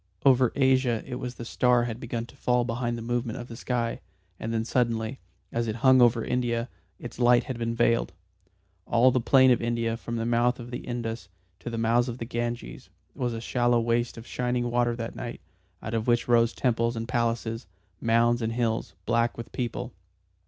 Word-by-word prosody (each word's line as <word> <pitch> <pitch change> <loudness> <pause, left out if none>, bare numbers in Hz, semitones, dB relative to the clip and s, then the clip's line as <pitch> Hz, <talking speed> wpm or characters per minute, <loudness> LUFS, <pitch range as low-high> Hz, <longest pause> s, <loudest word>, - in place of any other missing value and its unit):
Over 130 -3 +5
Asia 130 -4 +2
it 125 -1 -5
was 125 0 -5
the 120 - -7
star 125 0 +3
had 120 -1 -4
begun 120 -2 -4
to 120 - -17
fall 125 -2 +1
behind 120 0 -2
the 115 - -6
movement 120 +1 -2
of 120 0 -8
the 115 - -7
sky, 120 -1 -2 0.4
and 115 - -4
then 115 -1 -1
suddenly, 115 0 0 0.3
as 115 0 -1
it 110 - -2
hung 130 -1 +7
over 120 -1 +4
India, 120 -1 -1 0.3
its 120 - -9
light 120 0 +5
had 130 -4 -5
been 115 0 -1
veiled. 115 0 +2 0.8
All 120 +2 +5
the 125 0 +1
plain 130 +2 +5
of 120 - +3
India 115 -1 0
from 115 0 -6
the 115 0 -2
mouth 120 +1 +2
of 120 0 -8
the 120 - -4
Indus 115 -3 -5 0.3
to - - -6
the 115 - -4
mouths 115 +2 +2
of 120 - -5
the 115 - -5
Ganges 120 0 -4 0.2
was 120 -2 -2
a - - -4
shallow 120 0 +2
waste 115 +1 0
of 115 - -9
shining 125 0 -1
water 120 -1 +1
that 115 -1 -5
night, 120 0 -6 0.4
out 110 - -5
of 115 0 -1
which 120 -1 +2
rose 115 -1 +4
temples 115 -1 0
and 115 0 -4
palaces, 115 -1 -1 0.3
mounds 115 +1 +3
and 115 0 -1
hills, 115 -7 -1
black 115 0 +1
with 115 - -8
people. 120 -3 -4
120 Hz, 200 wpm, -27 LUFS, 115-125 Hz, 0.8 s, hung